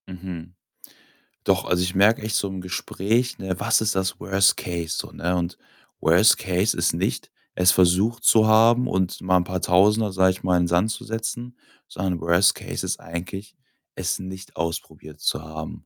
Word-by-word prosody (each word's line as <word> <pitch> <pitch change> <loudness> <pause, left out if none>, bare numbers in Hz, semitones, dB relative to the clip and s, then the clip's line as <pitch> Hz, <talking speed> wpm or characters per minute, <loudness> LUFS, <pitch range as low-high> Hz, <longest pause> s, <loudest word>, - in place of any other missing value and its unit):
Mhm. 90 -2 -9 0.9
Doch, - - +1
also, 90 0 0
ich 90 +1 -2
merke 105 +4 +4
echt 110 0 -3
so 100 - 0
im 95 -1 -6
Gespräch, 110 +6 -2
ne, 95 -1 -4
was - - +2
ist 110 -2 0
das 95 0 -2
Worst 95 +2 +2
Case 85 -2 -4
so, - - -5
ne? 90 +2 -2
Und 85 0 -3 0.4
Worst 90 +7 +5
Case 95 +4 0
ist - - +1
nicht, - - -3 0.2
es 90 0 +5
versucht 95 +6 +2
zu 110 -1 +5
haben 115 +3 +4
und 95 -1 -2
mal 90 0 +2
'n 90 - +1
paar 90 0 -4
Tausender, 105 +4 +3
sage 95 0 +3
ich 95 - -8
mal, 90 -1 +2
in 90 - +2
'n - - -2
Sand 90 +6 +1
zu - - -6
setzen, 115 +2 -5 0.3
sondern 90 -2 -3
Worst 85 +3 +4
Case - - -6
ist - - -3
eigentlich, 95 +4 -7 0.4
es - - -2
nicht 95 0 -9
ausprobiert 80 -2 -6
zu - - -1
haben. 80 0 -8
95 Hz, 185 wpm, -23 LUFS, 90-105 Hz, 0.9 s, Worst